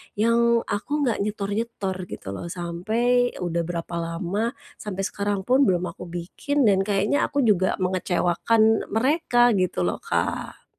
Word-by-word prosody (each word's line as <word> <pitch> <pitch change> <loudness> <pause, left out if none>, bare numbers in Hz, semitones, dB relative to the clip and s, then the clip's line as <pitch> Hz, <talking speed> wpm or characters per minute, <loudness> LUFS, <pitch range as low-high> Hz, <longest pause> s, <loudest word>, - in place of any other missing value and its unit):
yang 230 +2 +3
aku 205 +7 -4
nggak 240 -5 0
nyetor-nyetor 205 -1 -3
gitu - - -9
loh. 170 - -6
Sampai 215 +9 0
udah 170 -2 -2
berapa 170 0 -4
lama, 180 +9 -2 0.2
sampai 195 -2 -4
sekarang 200 0 -2
pun 260 +4 +4
belum 180 -2 +1
aku 170 - -10
bikin 175 +12 -2
dan 200 -4 +4
kayaknya 205 +7 +1
aku 285 -2 0
juga 190 -4 +3
mengecewakan 185 +4 +2
mereka 245 +1 +3
gitu 180 - 0
loh, 90 - -1
Kak. - - -3
205 Hz, 140 wpm, -24 LUFS, 175-235 Hz, 0.2 s, pun